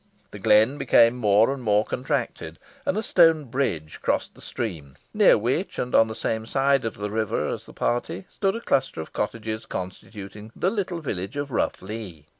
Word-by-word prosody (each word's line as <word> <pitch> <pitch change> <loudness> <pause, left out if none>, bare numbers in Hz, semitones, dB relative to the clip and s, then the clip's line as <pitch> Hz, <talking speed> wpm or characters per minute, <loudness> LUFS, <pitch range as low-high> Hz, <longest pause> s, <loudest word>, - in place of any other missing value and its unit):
The 105 - -9
glen 110 +6 +4
became 115 -3 +5
more 110 +1 +4
and 135 - -7
more 105 -2 +2
contracted, 130 +1 -3 0.3
and 195 - +1
a 220 - -1
stone 165 -6 +5
bridge 120 - -2
crossed - - -1
the - - -17
stream, 80 - -5 0.2
near 210 -2 +6
which, 125 - -1
and 125 - -3
on 115 - +6
the 110 - -6
same 110 0 -2
side 135 0 +2
of 115 - -3
the 105 0 -4
river 110 -1 -1
as - - -5
the - - -12
party, 160 +10 -2
stood 195 0 -1
a 230 - -4
cluster 135 - 0
of 80 - -7
cottages 110 +1 -3
constituting 100 +3 -7
the 185 - +1
little 185 -5 -3
village 105 - -4
of 145 -1 -3
Rough 115 - -1
Lee. 95 -7 -7
115 Hz, 190 wpm, -25 LUFS, 105-140 Hz, 0.3 s, near